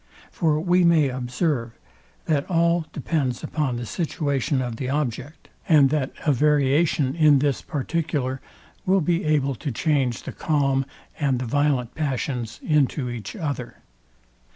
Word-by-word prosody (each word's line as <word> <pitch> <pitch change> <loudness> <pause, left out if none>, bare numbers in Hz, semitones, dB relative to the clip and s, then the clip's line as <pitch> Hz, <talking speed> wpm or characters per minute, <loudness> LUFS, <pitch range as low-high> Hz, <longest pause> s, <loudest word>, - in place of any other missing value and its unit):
For 155 -3 +1
we 180 +2 +3
may 165 -5 +4
observe, 125 -1 -2 0.5
that 145 -3 0
all 170 -1 +2
depends 140 -4 -2
upon 145 -6 -1
the 120 0 -4
situation 145 - -1
of 120 -3 -3
the 130 +1 -3
object, 140 +1 -3 0.2
and 145 -4 +6
that 145 -3 0
a 150 - +4
variation 145 0 +2
in 155 -3 +5
this 140 0 0
particular 145 -3 -2 0.4
will 190 0 +3
be 170 +3 0
able 145 -3 +1
to 140 +3 -5
change 135 -2 0
the - - -6
calm 135 -3 0 0.3
and 140 -4 +1
the 125 - -3
violent 140 -2 0
passions 130 -6 -3
into 145 -4 +1
each 105 -5 -6
other. 140 -6 -5
145 Hz, 140 wpm, -24 LUFS, 130-155 Hz, 0.5 s, and